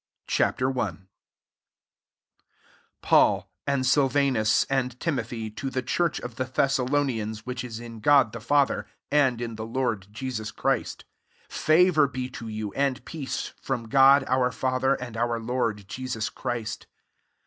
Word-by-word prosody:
CHAP. - - +1
I. - - +4
1 125 -7 -2 2.0
PAUL, - - +3 0.2
and 140 -2 +1
Silvanus, 135 -5 +3
and 130 -2 -2
Timothy, 115 -7 -3
to 110 +5 -4
the 130 -1 -2
church 165 +6 0
of 125 -2 -8
the 130 - -1
Thessalonians 130 -4 0
vfhich 125 0 -4
is 115 -2 -6
in 115 -1 -9
God 135 -1 +5
the 115 - -5
Father, 140 +4 +2 0.2
and 135 -5 +3
in 115 -2 -5
the 110 - -5
Lord 115 -5 -1
Jesus 110 -2 -4
Christ; - - -2 0.4
favour 155 -1 +4
be 130 -1 -5
to 115 -2 -7
you, 110 -2 -5
and 140 -1 -1
peace 150 -5 -5
[from 120 -4 -3
God 135 +2 +6
our 125 0 +2
Father, 130 +1 +1
and 120 -3 -7
our 115 0 0
Lord 115 -4 -2
Jesus 125 -2 -4
Christ. 115 -2 -4
125 Hz, 140 wpm, -26 LUFS, 115-135 Hz, 2.0 s, God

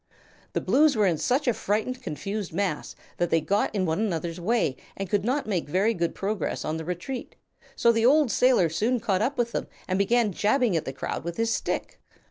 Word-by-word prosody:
The - - 0
Blues 300 0 +4
were 210 -2 +3
in 170 -5 +1
such 270 +3 +1
a 245 - +4
frightened, 220 +6 -2
confused 200 - -4
mass 180 -4 -2 0.2
that 175 -1 0
they 165 - +3
got 200 +6 0
in 190 -2 +1
one 160 +2 0
another's 170 -5 -2
way 190 - +1 0.2
and 195 - -3
could 200 +1 0
not 260 +6 0
make 185 -8 -2
very 195 +8 +2
good 170 -4 -2
progress 205 +1 -2
on 155 +1 -2
the 160 - -6
retreat, 180 +10 -5 0.4
so 235 - +4
the 225 0 +3
old 290 -2 +4
sailor 250 -8 +4
soon 220 +10 0
caught 200 -4 0
up 265 +6 0
with 235 -1 0
them - - -3 0.2
and 185 +1 0
began 225 +2 +3
jabbing 215 +2 +2
at 160 -1 0
the - - -3
crowd 130 - -4
with 170 0 -5
his 230 0 +1
stick. - - -3
205 Hz, 215 wpm, -26 LUFS, 175-240 Hz, 0.4 s, Blues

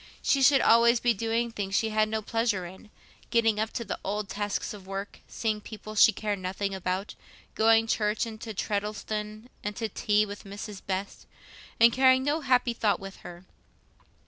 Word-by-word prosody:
She 275 - +2
should 270 +1 +6
always 235 +1 +5
be 240 -1 +2
doing 230 +2 -1
things 195 -3 -3
she 225 - +2
had 215 0 +1
no 220 0 -2
pleasure 225 -5 0
in, 190 +4 -12 0.4
getting 225 -3 +2
up 220 +1 -1
to 235 - -4
the - - -4
old 205 +1 -3
tasks 205 +2 -3
of 195 -2 -12
work, 195 +1 -6
seeing 215 -2 -2
people 215 0 -9
she 215 +1 +7
cared 210 -2 -3
nothing 195 +2 -3
about, 190 +1 -3 0.4
going 225 0 +4
to 225 - +1
church, 210 +1 0
and 220 -1 -9
to 225 - -6
Treddleston, 210 +2 -3 0.2
and 210 0 -4
to 225 -2 -3
tea 210 0 +1
with 205 0 -9
Mrs. 200 0 -8
Best, 195 +1 -4 0.5
and 230 0 +7
carrying 260 0 +5
no 295 +3 0
happy 250 -3 +2
thought 215 -3 +1
with 195 0 -9
her. 175 +1 -11
215 Hz, 185 wpm, -28 LUFS, 200-230 Hz, 0.5 s, she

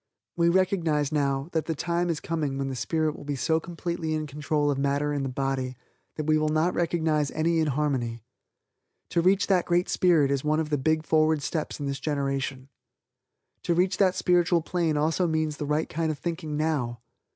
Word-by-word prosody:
We 170 0 +3
recognize 170 -5 +1
now, 140 -1 0
that 160 -2 -1
the 160 - -1
time 175 +3 -1
is 165 -3 -1
coming 155 -5 -2
when 135 0 -2
the 135 - -4
spirit 155 +6 -1
will - - -10
be 145 0 -3
so 160 +4 +1
completely 170 -1 -3
in 155 0 -2
control 145 0 0
of 135 - -2
matter 140 +1 0
in 145 - -1
the 135 - -2
body, 130 -1 -2 0.4
that 155 - -3
we 155 0 +3
will 155 0 +1
not 155 +3 +1
recognize 160 -4 +1
any 165 +1 +1
inharmony. 135 -7 -1 0.9
To 170 - +2
reach 190 +3 +3
that 185 -3 +2
Great 175 +1 +1
Spirit 160 -6 +3
is 140 -1 0
one 155 +1 +1
of 155 -1 -2
the 145 - +2
big 155 +2 +1
forward 155 -1 +2
steps 155 +3 -3
in 145 - -3
this 140 -1 -3
generation. 135 -2 -2 0.9
To 170 - 0
reach 180 +2 +2
that 190 -2 +3
spiritual 175 -2 +2
plane 165 -3 0
also 160 +4 +1
means 155 -2 -1
the 150 - -4
right 150 +2 0
kind 160 0 -2
of 155 - -2
thinking 160 -1 -4
now. 145 -7 -1
155 Hz, 195 wpm, -26 LUFS, 140-170 Hz, 0.9 s, We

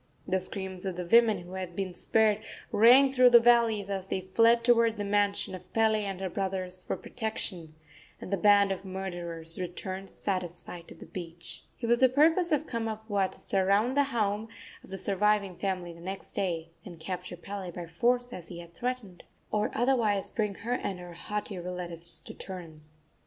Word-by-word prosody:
The 190 +1 +1
screams 190 0 -6
of 185 - -3
the 180 0 -4
women, 220 0 +5
who 175 - -12
had 185 -2 -5
been 190 -1 -3
spared, 215 +2 +2 0.3
rang 255 +5 +7
through 255 -1 +6
the 240 -1 +9
valleys 230 -4 +4
as 195 -1 -4
they 190 - -2
fled 230 +5 +4
toward 230 -2 +4
the 205 - -2
mansion 205 -1 +1
of 185 - -10
Pele 220 -1 +3
and 195 -2 -4
her 190 - -1
brothers 185 -1 -3
for - - -3
protection, 190 -8 -4 0.4
and 190 - -6
the - - +2
band 200 0 +5
of 195 0 -3
murderers 175 -4 -4
returned 185 +2 -5
satisfied 180 -2 -3
to - - -10
the - - -11
beach. 170 -2 -8 0.2
It - - -1
was 235 +1 +3
the 260 - +6
purpose 325 +6 +4
of 300 0 +2
Kamapuaa 220 -5 -1
to - - -9
surround 200 +6 +2
the 285 0 +4
home 215 -4 -1 0.4
of - - -15
the 195 - -4
surviving 200 0 +1
family 185 -2 -3
the 170 - -14
next 190 +2 -5
day, 170 -4 -2
and 175 -6 -10
capture 180 +1 -5
Pele 195 +1 -6
by 175 0 -6
force, 245 +9 0
as 175 -2 -7
he 175 - -8
had 170 0 -11
threatened, 240 -4 -4 0.3
or 210 0 +1
otherwise 230 -5 +1
bring 210 -3 -1
her 230 +5 -3
and 200 -6 -2
her 175 -1 -9
haughty 205 +2 -4
relatives 175 -1 -4
to - - -9
terms. 155 -5 -9
195 Hz, 185 wpm, -29 LUFS, 180-225 Hz, 0.4 s, the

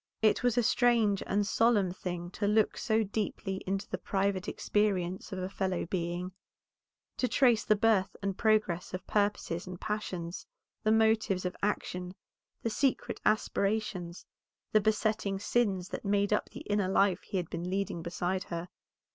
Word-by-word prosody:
It 215 - +4
was 245 -2 +1
a 245 - +4
strange 225 -4 +3
and 205 +1 +1
solemn 210 -3 +3
thing 175 -1 -5
to 205 +2 -1
look 210 +1 +3
so 220 -1 +1
deeply 200 -2 -3
into 195 +1 -1
the - - -4
private 195 -1 -1
experience 190 -4 0
of 190 - -4
a 185 0 -2
fellow 190 -2 -2
being; 175 +1 -3 0.9
to 255 - +1
trace 240 -4 +4
the 215 - +4
birth 205 -3 +2
and 195 -1 -2
progress 210 -5 +1
of 185 - -7
purposes 205 -4 0
and 180 -1 -7
passions, 185 -5 -4 0.3
the 215 - +2
motives 220 -4 +3
of 180 - -2
action, 180 -3 -2 0.5
the 230 - +1
secret 265 +5 0
aspirations, 200 -4 0 0.5
the 215 - +5
besetting 215 -2 +1
sins 195 -3 0
that - - -5
made 200 0 +2
up - - 0
the - - -9
inner 205 -2 0
life 190 0 +3
he 195 - -4
had 175 -3 -3
been 175 +2 -3
leading 190 -3 -2
beside 180 +2 -2
her. 170 +1 -5
200 Hz, 160 wpm, -31 LUFS, 185-215 Hz, 0.9 s, the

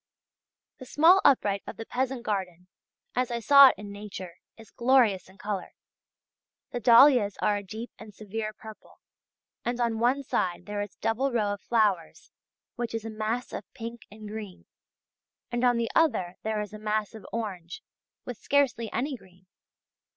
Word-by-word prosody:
The 255 - -10
small 340 +8 +5
upright 205 -7 +3
of - - -7
the 225 - -6
peasant 255 0 -2
garden, 185 -5 -3 0.5
as 250 -1 0
I 235 -1 -2
saw 280 +4 +8
it - - +2
in 205 -1 -9
nature, 200 -4 -8 0.2
is 225 -2 -15
glorious 235 -7 +2
in 190 - -19
colour. 205 -2 -5 1.0
The 245 - -3
dahlias 235 -2 +6
are 205 - +1
a - - -4
deep 220 +5 -8
and 220 -1 -11
severe 215 +1 -5
purple, 215 0 -14 0.6
and 240 0 -2
on 230 -2 0
one 255 +4 +2
side 180 -8 -2
there 205 +1 -4
is 205 -1 -6
a - - -53
double 260 +5 0
row 210 -4 0
of 205 - -8
flowers 210 -8 0 0.5
which 240 -1 -3
is 225 -1 -4
a 225 - -5
mass 220 +3 -3
of - - -7
pink 230 0 -8
and 215 +1 -11
green, 210 -3 -8 0.9
and 240 0 -1
on 245 -1 +4
the 230 -1 -1
other 185 - +1
there 220 -1 -2
is 210 0 -7
a 215 - -8
mass 215 -1 -2
of 220 -3 -11
orange 190 -7 -5 0.4
with 245 -3 -6
scarcely 270 -5 +1
any 270 +4 -2
green. 185 -5 -19
220 Hz, 175 wpm, -27 LUFS, 205-245 Hz, 1.0 s, saw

